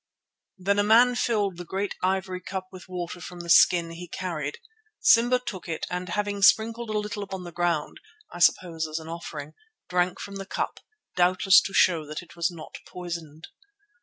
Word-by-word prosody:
Then 200 +2 +1
a - - +4
man 235 +4 +6
filled 210 -6 0
the 175 - -6
great 195 +3 -3
ivory 185 0 -1
cup 190 +1 -5
with 185 -1 -12
water 175 -1 -5
from 175 0 -8
the 170 -1 -2
skin 170 -1 +5
he 175 +1 -8
carried. 160 -5 -4 0.4
Simba 240 +2 +5
took 195 -9 -7
it 160 - -3
and 180 0 -3
having 205 +1 -2
sprinkled 225 +3 +4
a 215 - -1
little 210 0 -3
upon 195 -2 -6
the 175 - -8
ground, 170 -3 -1 0.3
I 175 - -7
suppose 165 -2 +2
as 155 0 -4
an 160 -1 -7
offering, 155 -3 -7 0.4
drank 180 0 0
from 200 -1 -7
the 195 -1 -7
cup, - - -3 0.4
doubtless 185 +2 +5
to 195 - -6
show 170 -4 +4
that 155 +3 -6
it 170 - -17
was 170 -1 +1
not 165 -3 -10
poisoned. 170 -3 -7
180 Hz, 185 wpm, -26 LUFS, 170-200 Hz, 0.4 s, man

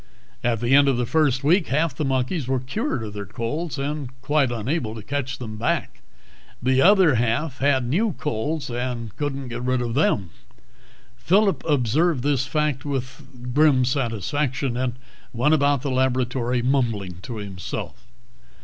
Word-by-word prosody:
At 115 -2 0
the 120 +2 +2
end 140 0 +6
of 135 -3 +2
the 125 - 0
first 140 -2 +2
week, 165 +3 +3
half 155 +2 +1
the 155 - -2
monkeys 135 +2 -1
were 130 0 +1
cured 135 - -3
of 105 -2 -6
their 100 -1 -6
colds 120 - -4
and 145 0 -3
were 125 - -15
quite 140 -2 +2
unable 120 0 -2
to 110 - -8
catch 140 0 -3
them 110 -3 -7
back; 115 - -2 0.6
the 130 +1 +2
other 190 -4 +6
half 120 +5 0
had 135 -2 +2
new 190 - +1
colds 150 +2 -3
and 120 -3 -4
couldn't 140 -3 -3
get 120 +1 -5
rid 130 0 0
of 120 -1 -2
them. 100 - +1 0.9
Phillip 185 - +2
observed 145 +2 +2
this 135 -2 +1
fact 150 -2 0
with 125 -2 -6
grim 145 -3 +4
satisfaction, 130 +1 -1
and 125 -1 -1 0.4
went 125 +6 +2
about 145 -3 +2
the 140 - -1
laboratory 125 -1 0
mumbling 115 -9 0
to 120 +2 -6
himself. 100 +3 -6
130 Hz, 160 wpm, -23 LUFS, 120-145 Hz, 0.9 s, end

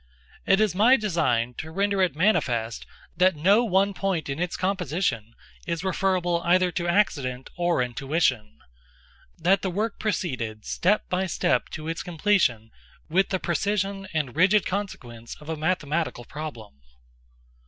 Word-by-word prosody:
It 195 - +4
is 215 -4 +2
my 230 +8 +5
design 150 - 0
to 160 - -6
render 200 +3 0
it 185 -4 +1
manifest 120 - 0 0.3
that 180 +1 +3
no 195 +10 +4
one 200 -2 +2
point 190 -7 -2
in 140 +3 -3
its 175 0 -2
composition 170 - -1 0.3
is 170 0 -2
referable 185 -2 0
either 180 +1 +3
to 175 0 -2
accident 140 -9 0
or 175 -6 +1
intuition—that 115 - -2
the 190 - -1
work 210 +4 -2
proceeded, 125 - -3
step 205 +4 +1
by 185 +1 -1
step, 125 -6 0
to 155 0 -6
its 165 +1 -3
completion 160 - +1 0.4
with 185 +4 +2
the 190 - 0
precision 195 +2 -1
and 150 -6 -2
rigid 190 +5 +4
consequence 120 - -5
of 150 +1 -13
a 160 - -1
mathematical 155 -5 -1
problem. 120 - -8
170 Hz, 140 wpm, -25 LUFS, 130-195 Hz, 0.4 s, my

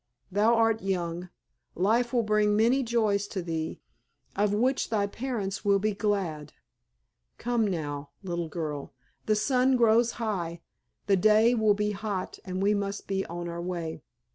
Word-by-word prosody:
Thou 215 +5 +4
art 225 -1 +2
young, 175 -2 -2 0.5
life 230 +6 +2
will 240 -2 +2
bring 210 -1 +2
many 235 +5 +3
joys 215 -4 +1
to 190 -3 -4
thee, 160 -2 -4 0.5
of 205 0 +2
which 250 +6 +1
thy 210 -3 +1
parents 210 -3 -4
will 200 -1 +4
be 210 +2 0
glad. 195 -8 -2 0.8
Come 235 -2 0
now, 145 -6 -3
little 170 -3 -3
girl, 150 -5 -5 0.3
the 215 - +3
sun 255 +4 +3
grows 235 0 +4
high, 175 -7 -3 0.4
the 195 -1 +3
day 215 +4 +5
will 220 -3 +3
be 210 0 0
hot, 205 -2 -4
and 185 0 -3
we 205 +1 +4
must 200 0 -3
be 195 -1 -2
on 175 0 -5
our 170 0 -5
way." 170 -3 -4
205 Hz, 155 wpm, -28 LUFS, 180-220 Hz, 0.8 s, day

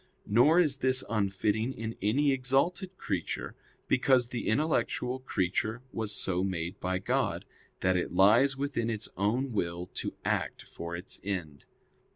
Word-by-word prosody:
Nor 125 +11 +5
is 150 -6 +3
this 130 -1 +4
unfitting 105 +3 0
in 115 -1 -5
any 135 +9 +2
exalted 140 +9 +1
creature; 95 - -3 0.3
because 125 -2 +3
the 120 - -4
intellectual 130 -1 0
creature 110 0 -1
was 110 -2 -2
so 95 -3 0
made 90 0 -3
by 95 0 -1
God, 95 - -1 0.4
that 95 0 +2
it 90 - -1
lies 115 +9 +5
within 140 -5 -1
its 110 -1 -1
own 120 +8 0
will 85 -4 -2
to - - -4
act - - -1
for 85 0 -7
its 90 +3 -4
end. 90 -8 -4
110 Hz, 145 wpm, -30 LUFS, 95-130 Hz, 0.4 s, Nor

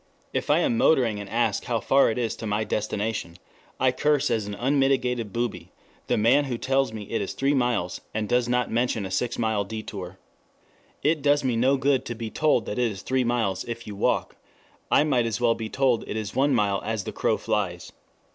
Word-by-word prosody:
If - - -2
I - - +5
am 245 -5 +1
motoring 125 - +3
and 100 -1 -7
ask 120 +2 0
how 120 -3 0
far 135 +6 +4
it 110 - -2
is 120 -2 -1
to 110 - -5
my 105 +1 0
destination, 105 -4 -3 0.4
I 130 0 +3
curse 145 +2 +1
as 110 -3 0
an 105 - -5
unmitigated 125 -3 +1
booby 100 -7 -3 0.4
the - - +1
man 125 +7 +4
who 125 -3 -3
tells 135 +1 +1
me 110 -1 -6
it 115 +2 -3
is 100 - -4
three 140 +1 +1
miles, 120 -9 0
and 110 -1 -2
does 120 +2 +1
not 125 0 +1
mention 115 -3 0
a 95 - -6
six 115 +5 -1
mile 110 -3 0
detour. 100 -3 -7 0.9
It 155 +1 +2
does 145 0 +3
me 125 -3 +1
no 130 +4 +3
good 135 0 +2
to 120 - -4
be 115 -1 -6
told 155 -6 +2
that 105 - -4
it 120 -2 +2
is 100 - -8
three 130 0 +1
miles 115 -6 0
if 120 0 -6
you 105 - -7
walk. 100 - 0 0.5
I - - +5
might 130 -6 +1
as 110 -1 -2
well 120 -1 +3
be 110 -1 -5
told 130 -3 +1
it - - -3
is 105 -2 -4
one 135 +1 +2
mile 100 -3 +1
as 110 -2 -2
the - - -5
crow - - +1
flies. 90 -5 -2
115 Hz, 215 wpm, -25 LUFS, 105-130 Hz, 0.9 s, I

